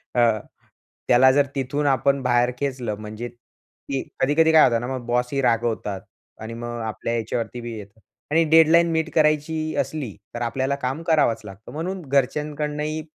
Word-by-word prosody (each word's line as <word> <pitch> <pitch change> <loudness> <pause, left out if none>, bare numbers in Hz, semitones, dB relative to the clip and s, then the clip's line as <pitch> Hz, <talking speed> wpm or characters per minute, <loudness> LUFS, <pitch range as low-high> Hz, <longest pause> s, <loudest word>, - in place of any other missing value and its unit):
अ, 120 -3 +4 0.7
त्याला 130 +2 +6
जर 140 +1 +3
तिथून 140 +2 -1
आपण 140 +1 +2
बाहेर 120 0 +2
खेचलं 130 -6 -2
म्हणजे, 110 +2 -6 0.6
की 135 -1 -1 0.2
कधी-कधी 160 +4 +3
काय 160 -1 +7
होतं 115 -1 +3
ना 120 - -4
मग 130 -2 -4
बॉसही 125 +3 0
रागवतात 115 -5 0 0.4
आणि 110 +1 -6
मग 120 0 -5
आपल्या 110 +1 -3
याच्यावरती 115 +1 -3
बी 120 -1 -6
येतं. 100 +1 -12 0.3
आणि 165 +2 +4
डेडलाईन 165 +1 +6
मीट 160 0 0
करायची 155 +1 +1
असली 135 -6 -5 0.2
तर 120 - -5
आपल्याला 130 +3 -1
काम 135 +2 -3
करावंच 155 -9 +2
लागतं. 100 0 -11
म्हणून 180 +5 -4
घरच्यांकडनंही 150 +3 -1
130 Hz, 155 wpm, -23 LUFS, 120-150 Hz, 0.7 s, काय